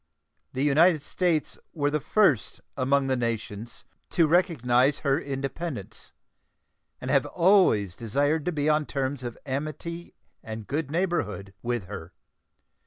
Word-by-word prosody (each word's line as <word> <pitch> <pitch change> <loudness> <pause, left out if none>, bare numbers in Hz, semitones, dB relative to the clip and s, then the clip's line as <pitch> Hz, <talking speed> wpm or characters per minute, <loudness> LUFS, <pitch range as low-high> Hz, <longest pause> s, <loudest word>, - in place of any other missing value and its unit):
The 130 - -1
United 155 +2 +4
States 165 -1 -1 0.2
were 145 -2 +1
the 150 - +1
first 155 - +2 0.2
among 135 +1 +2
the 135 -1 +1
nations 115 -2 -4 0.2
to 170 - +3
recognize 145 -6 +2
her 140 0 +3
independence, 135 - -5 0.9
and - - -3
have - - +3
always 170 - +3
desired 145 - 0
to 180 - +1
be 150 -2 -1
on 150 -1 +2
terms 135 -1 -2
of 120 -2 -5
amity 155 +5 -5 0.3
and 110 -1 -7
good 145 +3 -2
neighborhood 120 - -2
with 120 -4 -2
her. 90 -3 -8
140 Hz, 130 wpm, -26 LUFS, 120-160 Hz, 0.9 s, United